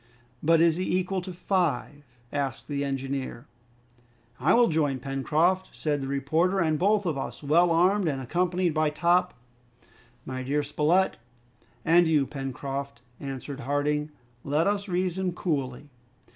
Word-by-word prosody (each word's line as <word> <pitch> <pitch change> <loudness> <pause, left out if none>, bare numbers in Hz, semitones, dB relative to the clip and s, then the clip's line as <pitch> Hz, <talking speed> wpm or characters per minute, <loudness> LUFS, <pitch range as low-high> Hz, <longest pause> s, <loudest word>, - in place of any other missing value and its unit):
"But 165 +1 +4
is 165 -1 +4
he 185 0 0
equal 185 0 -1
to 185 +1 -7
five?" 150 -8 -2 0.2
asked 135 -4 -3
the 140 -1 -2
engineer. 135 -2 -4 0.9
"I 135 - +4
will 240 0 +5
join 150 -4 +1
Pencroft," 150 +8 0
said 145 -2 -1
the 135 - -4
reporter, 160 +8 +1
"and 155 -3 +1
both 205 +2 +2
of 155 -6 -1
us, 135 - -6
well 170 +5 +4
armed 180 +3 +3
and 140 -3 -1
accompanied 175 +5 0
by 155 0 +2
Top 175 +4 +2 0.4
" 120 0 -30
"My 130 0 -4
dear 145 +3 0
Spilett, 155 +6 +1 0.7
and 170 +1 +5
you, 150 -4 +3
Pencroft," 135 -1 -5 0.2
answered 135 0 -6
Harding, 145 +3 -1 0.3
"let 150 +4 +1
us 200 0 0
reason 185 0 -1
coolly. 145 -5 -3
150 Hz, 145 wpm, -27 LUFS, 135-180 Hz, 0.9 s, will